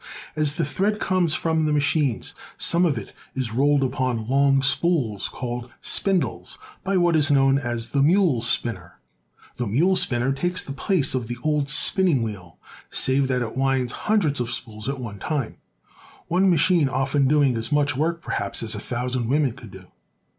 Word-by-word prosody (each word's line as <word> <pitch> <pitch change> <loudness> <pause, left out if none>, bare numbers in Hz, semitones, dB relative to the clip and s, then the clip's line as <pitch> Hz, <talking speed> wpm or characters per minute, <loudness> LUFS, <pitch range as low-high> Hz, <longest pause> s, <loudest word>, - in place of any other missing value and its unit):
As 150 -1 0
the 165 - 0
thread 210 +2 -1
comes 180 -4 +1
from 160 -1 0
the 155 - 0
machines 145 -4 0 0.2
some 170 +1 +3
of 145 -6 -1
it 105 - -8 0.2
is 125 -4 -3
rolled 140 +3 +2
upon 125 -4 -2
long 135 +1 +3
spools, 135 - 0
called 120 -1 -6
spindles, 195 -3 0 0.3
by 195 0 0
what 175 -2 +3
is 150 -2 +3
known 135 -1 +3
as 120 -3 -4
the 140 - +1
mule 165 - +3
spinner. 110 -6 -2 0.6
The 120 - -2
mule 165 - +2
spinner 125 -3 +2
takes 175 +6 -1
the - - -8
place 145 +1 0
of 125 -3 -2
the 120 +1 -5
old 150 -2 0
spinning 155 -1 +3
wheel, 95 -6 -7 0.3
save 135 +1 +2
that 125 -1 0
it 115 - -6
winds 130 -2 0 0.2
hundreds 170 -11 +2
of 120 -1 -2
spools 110 -1 -4
at 140 -1 -4
one 110 -5 -7
time, 145 -3 -3 0.7
one 185 +3 +2
machine 170 -3 +3
often 135 +1 +1
doing 140 -3 +3
as 115 +4 -3
much 145 -1 +1
work, 165 +4 -1
perhaps, 100 +3 -2
as 115 - -2
a 105 - -5
thousand 125 +1 -3
women 145 -1 +2
could 120 -2 -12
do. 95 -1 -13
135 Hz, 175 wpm, -23 LUFS, 120-155 Hz, 0.7 s, some